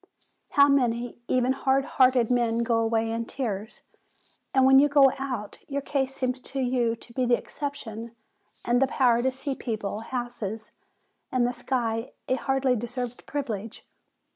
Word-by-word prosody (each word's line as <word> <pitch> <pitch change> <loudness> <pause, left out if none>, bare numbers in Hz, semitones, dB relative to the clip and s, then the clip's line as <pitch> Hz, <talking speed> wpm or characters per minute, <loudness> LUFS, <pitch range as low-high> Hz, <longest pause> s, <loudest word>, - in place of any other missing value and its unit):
"How 280 -2 +7
many, 245 -4 +1
even 255 0 +2
hard 270 0 +1
hearted 255 -4 +3
men, 235 -1 +2
go 230 -1 +2
away 225 0 +1
in 230 0 -2
tears! 220 -5 -4 0.7
And 265 -1 +4
when 265 0 +8
you 290 +1 +5
go 280 -2 +6
out, 250 -7 -4
your 280 -1 -3
case 270 -2 -1
seems 255 -1 -1
to 270 +1 -6
you 245 -3 +1
to 235 +1 -15
be 255 0 0
the 240 0 +4
exception, 235 -6 -6 0.5
and 240 +1 +2
the 270 - +4
power 245 -3 +3
to 260 - +2
see 270 +1 -4
people, 215 -5 -4
houses, 225 -3 -5 0.6
and 255 -2 +2
the 245 - 0
sky 230 -3 -2
a - - +1
hardly 265 -1 +1
deserved 245 +1 -5
privilege 225 -7 -4
245 Hz, 160 wpm, -26 LUFS, 230-265 Hz, 0.7 s, when